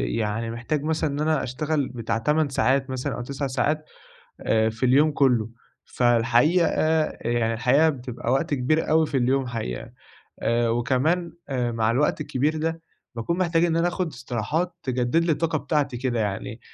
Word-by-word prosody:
يعني 115 +1 -2
محتاج 130 +5 -3
مثلًا 160 0 0
إن 140 +1 -4
أنا 155 -1 +1
أشتغل 145 +2 -1
بتاع 115 -3 -3
8 150 +5 +1
ساعات 135 +2 +1
مثلًا، 130 -1 -3
أو - - -5
9 140 +2 -4
ساعات 150 +4 -1 0.6
آآ 110 0 +2
في 110 +3 -2
اليوم 145 +5 +4
كله، 125 -6 +2 0.4
فالحقيقة 120 +8 +3 0.5
يعني 115 -1 0
الحقيقة 135 +7 +3
بتبقى 125 -4 -4
وقت 145 +3 +1
كبير 145 +4 +1
أوي 160 0 +4
في 140 - -2
اليوم 130 +1 +1
حقيقة، 110 - -5 0.6
وكمان 125 +9 +1 0.2
مع 120 -4 0
الوقت 140 +6 +1
الكبير 150 +5 0
ده 165 +1 -2 0.3
باكون 145 +10 -2
محتاج 170 -2 +2
إن 165 -1 +1
أنا 170 +1 +2
آخد 180 0 -2
استراحات 130 - -2
تجدد 130 +5 +1
لي 170 - +2
الطاقة 160 0 0
بتاعتي 145 -3 -1
كده 120 -2 -1
يعني، 105 +2 -3
130 Hz, 160 wpm, -24 LUFS, 120-155 Hz, 0.6 s, اليوم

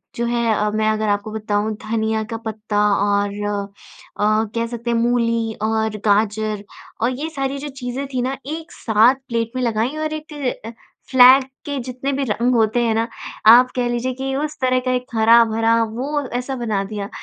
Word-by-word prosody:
जो 235 - -1
है 230 -3 +1
मैं 215 0 0
अगर 215 0 0
आपको 205 +1 -1
बताऊँ 215 0 -1
धनिया 220 0 -1
का 225 +1 -5
पत्ता 215 -1 -4 0.2
और 200 0 +1 0.9
अ, 215 +1 +2
कह 230 0 0
सकते 235 0 -5
हैं 235 - +2
मूली 230 -1 +1
और 220 -1 0
गाजर 210 0 +1 0.4
और 245 - +2
ये 315 +2 -3
सारी 275 -3 -3
जो 290 - -6
चीज़ें 250 +2 -4
थीं 250 - 0
ना 265 +2 -2
एक 320 +2 -6
साथ 225 +3 +3
प्लेट 230 -1 -2
में 255 - -1
लगाईं 235 +5 -1
और 310 0 -2
एक 310 0 -7 0.8
फ्लैग 260 +1 +8 0.2
के 285 -1 -3
जितने 255 +2 -4
भी 275 +1 -1
रंग 240 +4 +1
होते 225 +1 +2
हैं 230 - +1
ना, 225 +1 0 0.4
आप 245 +3 +8
कह 245 -1 0
लीजिए 240 +2 -1
कि 265 +1 -4
उस 300 +2 -3
तरह 255 0 +2
का 255 - +1
एक 250 0 -1
हरा-भरा 225 0 +4
वो 265 +7 -3 0.2
ऐसा 260 +2 -4
बना 220 -5 -1
दिया। 200 0 -5
230 Hz, 180 wpm, -20 LUFS, 220-255 Hz, 0.9 s, फ्लैग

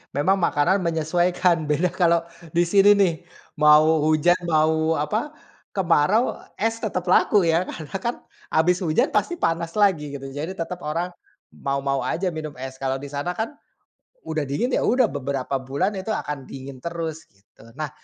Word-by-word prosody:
memang 175 +8 +2
makanan 170 +4 +2
menyesuaikan, 170 0 +1
beda 160 +5 +2
kalau 170 -2 +3 0.3
di 175 - +4
sini 195 +3 +5
nih, 190 -4 +3 0.5
mau 155 +1 +6
hujan 155 +3 +3
mau 160 +1 +2
apa, 215 - -2 0.4
kemarau, 190 - +2 0.2
es 225 +2 -1
tetap 185 -5 -2
laku 185 +1 +4
ya. 165 +1 +3
Karena 155 -3 -8
kan 235 +3 -1 0.3
habis 175 +4 +2
hujan 180 - +1
pasti 345 - 0
panas 165 - -1
lagi 155 -9 +2
gitu. 135 - -10
Jadi 160 +7 -5
tetap 175 +1 -5
orang, 170 +4 -3 0.4
mau-mau 140 0 -1
aja 180 0 -1
minum 155 -2 -6
es. 130 0 -6
Kalau 135 0 -1
di 140 - -8
sana 145 +5 -3
kan, 225 +7 -3 0.8
udah 155 -2 -1
dingin 145 - -1
ya - - 0
udah 250 0 +3
beberapa 140 -1 -3
bulan 135 +8 -1
itu 190 +3 -3
akan 145 -8 -4
dingin 135 0 -9
terus 165 -2 -5
gitu. 100 +2 -23
Nah, 155 +2 -4
165 Hz, 160 wpm, -23 LUFS, 145-185 Hz, 0.8 s, mau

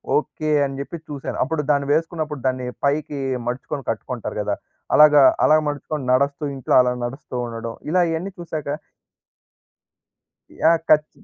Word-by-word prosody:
Okay 155 0 -1 0.2
అని 135 0 -5
చెప్పి 140 +4 -5
చూసాను. 140 -2 -5
అప్పుడు 150 +3 -1
దాన్ని 140 -1 +1
వేసుకున్నప్పుడు 155 -3 -2
దాన్ని 130 -1 -1 0.2
పైకి 145 0 0 0.3
మడుచుకొని 135 +3 -4
కట్టుకుంటారు - - -5
కదా! - - -1 0.4
అలాగా, 150 -2 +8 0.2
అలా 155 - +6
మడుచుకొని 145 -1 -3
నడుస్తూ 140 +3 +1
ఇంట్లో 130 - -2
అలా 125 - +1
నడుస్తూ 130 +1 -7
ఉండడం. 115 0 -5 0.2
ఇలా 180 +2 +3
ఇయన్నీ 175 +5 -3
చూశాక 155 -4 -5 1.9
యాహ్! 165 0 +4
ఖచ్ 150 0 +5
145 Hz, 135 wpm, -22 LUFS, 135-155 Hz, 1.9 s, అలాగా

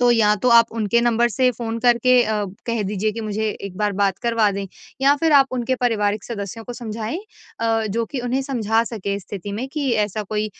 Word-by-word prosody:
तो 245 -1 +5
या 210 -2 +4
तो 250 - +3
आप 230 0 +7
उनके 230 +1 +1
नंबर 240 0 +2
से 250 +3 +2
फ़ोन 230 -1 -4
करके 245 +1 +4
अ, 215 -2 -1 0.2
कह 230 -2 -1
दीजिए 210 +2 -1
कि 230 - -5
मुझे 215 0 -2
एक 195 -2 -7
बार 210 0 0
बात 195 -1 +2
करवा 230 -3 +2
दें। 195 0 -4 0.3
या 275 +1 +5
फिर 320 +1 +1
आप 275 -2 +7
उनके 255 +1 0
पारिवारिक 215 -4 0
सदस्यों 225 0 -6
को 245 - -6
समझाएँ 225 +3 -5 0.4
अ, 225 -1 +1
जो 230 +3 0
कि 270 - -3
उन्हें 250 +2 -1
समझा 230 -4 +1
सकें 200 -3 -3
स्थिति 200 0 -7
में 225 +6 -3
कि 290 -4 -1
ऐसा 210 +1 -4
कोई 210 +1 -2
225 Hz, 215 wpm, -21 LUFS, 210-245 Hz, 0.4 s, आप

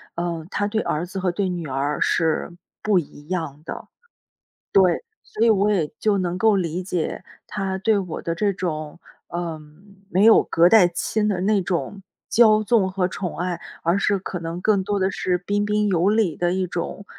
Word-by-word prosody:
呃， 170 -2 -3
他 205 - -1
对 220 +1 -1
儿 155 +3 -2
子 185 +2 -6
和 185 -1 0
对 190 +1 -1
女 175 -3 -4
儿 140 +2 -2
是 160 +1 +1 0.3
不 210 -3 +2
一 145 -1 -10
样 160 -5 -4
的， - - -7 0.8
对， 190 - +4 0.2
所 220 - -2
以 - - +5
我 210 0 +3
也 165 -7 +1
就 210 -2 +2
能 180 -1 -1
够 220 +1 +4
理 180 -1 -2
解， 180 -1 -3 0.2
他 195 -2 -3
对 205 +2 +2
我 180 -4 -4
的 165 0 -3
这 205 +3 +1
种， 155 -4 -4 0.3
嗯， 175 +4 -7
没 190 +3 +2
有 225 - +7
隔 170 +1 +4
代 185 -2 +6
亲 210 +4 -1
的 190 -4 -1
那 200 0 +2
种， 190 +3 -3 0.3
骄 215 -2 +5
纵 210 -4 +2
和 185 -1 0
宠 185 -2 -5
爱， 180 -1 -2 0.2
而 170 +4 +2
是 200 0 +1
可 185 -1 -5
能 165 +1 -5
更 200 -2 +2
多 205 0 -1
的 190 +1 +2
是 180 -1 0
彬 205 +3 -1
彬 210 0 +1
有 185 0 +2
礼 210 -7 +2
的 175 0 0
一 185 0 -1
种， 180 +3 -5
185 Hz, 205 characters per minute, -22 LUFS, 170-205 Hz, 0.8 s, 有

